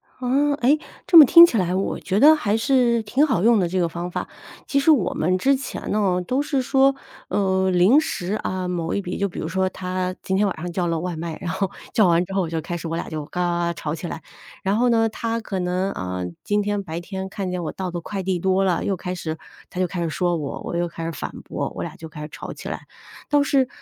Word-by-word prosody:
啊， 275 +3 +1
哎， 275 +5 +4 0.3
这 340 - +6
么 305 - +12
听 335 +5 +10
起 245 - -1
来 180 -2 0
我 195 - -1
觉 200 +3 -1
得 310 +2 +8
还 210 -7 0
是 235 -1 +2
挺 265 +8 +2
好 215 - +1
用 230 -2 +5
的 175 - +1
这 185 +1 0
个 170 - +1
方 175 +2 -5
法。 - - -4 0.4
其 280 - +1
实 280 - +2
我 280 - +4
们 185 +2 +1
之 275 +7 +3
前 275 - -6
呢， 190 -4 +1
都 260 +8 0
是 280 -3 0
说， 270 +1 +3 0.3
呃， 190 -1 +1
临 185 +10 +5
时 205 - -2
啊， 185 -3 -3
某 170 -2 -2
一 200 - 0
笔 180 -2 -5
就 200 - 0
比 180 - -8
如 160 - -3
说 190 +1 +1
他 185 0 -3
今 190 0 0
天 205 0 +3
晚 190 - -2
上 175 +2 -5
叫 175 0 -1
了 165 -1 0
外 175 -2 -4
卖， 165 -1 -5
然 175 - -3
后 190 +1 -1 0.2
叫 215 -4 +4
完 170 0 +3
之 195 - -8
后 190 -3 0
就 160 -1 -3
开 175 +2 -4
始 165 0 -6
我 165 - -3
俩 170 - -4
就 155 -2 -5
嘎 180 +4 -4
嘎 175 -1 0
嘎 170 - -1
吵 150 -1 -4
起 165 +2 -5
来。 165 - -6 0.4
然 195 +2 +1
后 245 +2 +3
呢 225 -1 +3
他 230 +1 -3
可 195 -3 -4
能， 180 +2 -1
呃， 90 0 -4 0.2
今 205 0 +1
天 205 0 -1
白 170 -2 -5
天 190 +2 -5
看 195 -1 -4
见 180 -1 -3
我 160 - -3
到 185 -2 -4
的 175 - -3
快 195 +2 -5
递 185 -1 -1
多 190 +2 +2
了 180 -3 0
又 195 - 0
开 180 0 -5
始 160 -2 -4 0.3
他 185 -1 -3
就 - - +3
开 175 0 -4
始 165 - -1
说 175 +1 0
我， 145 -3 -5
我 170 - -4
又 175 0 0
开 165 0 -7
始 165 - -2
反 145 - -6
驳， - - -3
我 - - -4
俩 - - -6
就 160 - -9
开 150 -1 -10
始 150 - -6
吵 - - -7
起 - - -8
来。 - - -6 0.4
倒 290 -1 +4
是 270 -3 +2
185 Hz, 285 characters per minute, -22 LUFS, 175-225 Hz, 0.4 s, 么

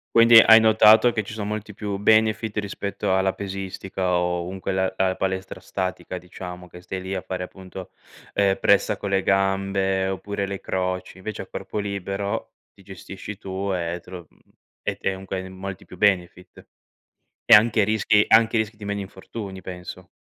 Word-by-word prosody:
Quindi 115 0 +8
hai 115 0 +8
notato 110 +1 +6
che 110 -2 -2
ci 105 - -8
sono 105 -2 -4
molti 105 0 -5
più 100 0 -4
benefit 110 +1 +2
rispetto 100 -2 -2
alla 95 0 +1
pesistica 95 -1 -4
o 90 0 0
comunque 95 +1 -4
la 95 0 0
alla 95 -1 +1
palestra 95 0 -3
statica, 95 -1 -4
diciamo, 90 0 -9
che 90 +1 -13
stai 95 +1 -6
lì 95 +1 -4
a 95 - -4
fare 95 -1 -5
appunto, 95 0 -9 0.4
ehm, 100 -1 +2
pressa 100 -1 +3
con 100 - -4
le 95 0 +1
gambe 95 0 +1
oppure 100 +1 -3
le 100 0 -5
croci. 95 0 -3
Invece 105 +3 -6
a - - -9
corpo - - -5
libero 100 0 -3 0.2
ti 100 - -19
gestisci 95 +1 -9
tu 95 0 -3
e 85 -1 -2
te - - -16
lo 90 -3 -9
mhmm, - - -29 0.4
e - - -2
te 95 - -1
comunque 95 0 -5
hai 95 - -9
molti 95 0 -7
più 90 - -13
benefit 90 -2 0 0.8
e - - +2
anche 110 0 +3
rischi 105 0 +3
e - - -2
anche 110 0 +5
rischi 110 0 -1
di 105 - -10
meno 100 0 -3
infortuni, 95 0 -8
penso. 90 0 -9
95 Hz, 180 wpm, -23 LUFS, 95-105 Hz, 0.8 s, Quindi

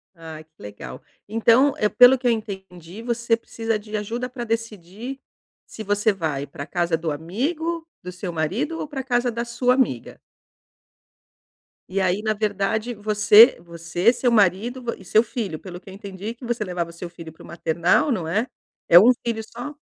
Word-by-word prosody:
Ah, 160 -2 -10
que 155 - -40
legal. 100 -12 -9 0.3
Então 230 +6 +4
eh, 210 - +1
pelo 250 +5 +7
que 250 - -1
eu 240 - +5
entendi, 190 -3 -6
você 235 -1 0
precisa 225 -1 -3
de 210 0 -5
ajuda 235 +5 -4
pra 245 -1 -6
decidir 225 +2 -5 0.5
se 220 - -9
você 205 +1 +1
vai 155 -7 -3
pra 145 +1 -9
casa 175 -2 0
do 160 -1 -3
amigo 310 - -3 0.2
do 180 - -6
seu 180 0 -6
marido 205 - -2
ou - - -4
pra 270 -3 -5
casa 245 -1 0
da 235 +1 -3
sua 245 +1 +1
amiga. 240 - -1 1.7
E 195 +2 -1
aí, 190 +2 +1
na 215 0 0
verdade, 215 +2 -1
você 215 +2 +6
você, 170 +5 0
seu 245 0 0
marido, 220 +5 +2
e 190 - -14
seu 215 +4 +4
filho. 220 - -4
Pelo 180 -2 -9
que - - -14
eu 190 - -10
entendi 200 +2 -7
que 245 +1 -12
você 235 -2 -2
levava 175 -3 -4
seu 170 +1 -8
filho 165 -2 -11
para - - -16
o - - -12
maternal, 170 - +1
não 180 -8 -1
é? 220 +10 0 0.4
É 170 - +8
1 235 +6 +7
filho 225 -2 -2
só? 245 +6 -8
210 Hz, 180 wpm, -23 LUFS, 175-235 Hz, 1.7 s, É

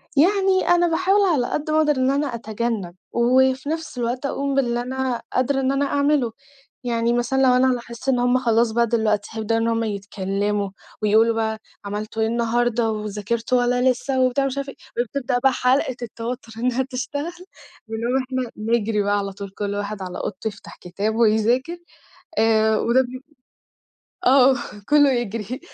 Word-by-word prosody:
يعني 380 +4 +3
أنا 350 0 +4
باحاول 380 +4 +2
على 255 -7 +1
قد 305 +1 -2
ما 310 - +2
أقدر 300 -2 +3
إن 260 +1 +2
أنا 285 +1 0
أتجنَّب 220 -5 -3 0.2
وفي 260 +3 +2
نفْس 320 -4 -4
الوقت 245 +3 -2
أقوم 275 0 -1
باللي 240 -3 +1
أنا 260 -1 -2
قادرة 270 +2 +1
إن 265 0 +1
أنا 280 +1 +1
أعمله، 280 -4 +1 0.5
يعني 235 -1 0
مثلًا 240 +3 +1
لو 255 -2 +5
أنا 255 0 +4
لاحظت 240 +2 -5
إن 250 - +2
هُم 245 +1 +3
خلاص 230 -2 +2
بقى 235 +1 +2
دلوقتي 215 -3 0
هيبدأوا 225 +1 0
إن 230 - 0
هُم 230 0 +1
يتكلّموا 200 0 -2 0.3
ويقولوا 220 +2 +4
بقى: 220 -1 -1 0.3
"عملتوا 215 +2 -4
إيه 220 - +2
النهارده 235 0 +1
وذاكرتوا 215 +3 -2
والّا 245 +1 +2
لسه." 260 +1 -2
وبتاع 255 +2 +2
ومش 275 0 -2
عارفة 275 0 -3
إيه، 240 - -5
وبتبدأ 250 0 -2
حلَقة 255 0 +1
التوتُّر 235 +1 -6
إنها 250 +1 0
تشتغل 285 +5 -4 0.6
بنقوم 230 +3 -1
إحنا 255 -2 -3
نجري 220 -1 0
بقى 205 +1 +1
على 200 -1 -2
طول 200 0 -7
كل 200 +1 -4
واحد 205 0 -4
على 180 -1 -5
أوضته 190 - -4
يفتح 205 -2 -8
كتاب 205 +5 -2
ويذاكر 235 +8 +2 0.6
آآ، 220 0 +3
وده 245 +3 +3
بي 255 +1 -8 1.0
آه، 265 0 +6 0.3
كلّه 290 -2 +5
يجري، 230 0 -3
240 Hz, 165 wpm, -22 LUFS, 220-265 Hz, 1.0 s, آه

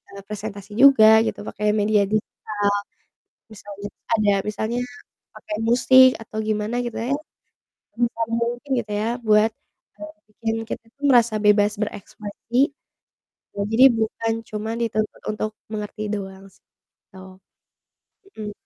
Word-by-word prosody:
eee, 200 - -8
presentasi 205 -1 -7
juga 220 -6 +8
gitu - - -4
pakai 210 0 -3
media 210 0 +3
digital. 205 -1 -2 0.8
Misalnya 205 -1 -9
tuh - - -56
ada 210 -1 +3 0.2
misalnya 220 +3 -2 0.6
pakai 210 - -6
musik 260 +2 +7
atau 220 0 -8
gimana 215 +2 -1
gitu 235 - -6
ya. 240 +4 -2 0.8
Sebisa 235 -1 -1
mungkin 235 +4 -2
gitu 215 -3 -4
ya 220 - -1 0.2
buat, 215 +1 +5
eee, - - -51 0.6
bikin 225 +1 -3
kita - - -5
tuh 280 - -19
merasa 235 -4 +4
bebas 210 0 +4
berekspresi, 210 +2 -6 1.0
ya 200 - -5
jadi 230 +4 +5
bukan 225 +1 -1 0.2
cuman 220 +1 -4
dituntut 215 -2 -2
untuk 215 0 -3 0.2
mengerti 210 0 -5
doang 195 -1 -7
sih, - - -28 0.5
gitu. 190 - -12 1.2
Mhm. 210 -1 -5
215 Hz, 130 wpm, -22 LUFS, 210-230 Hz, 1.2 s, juga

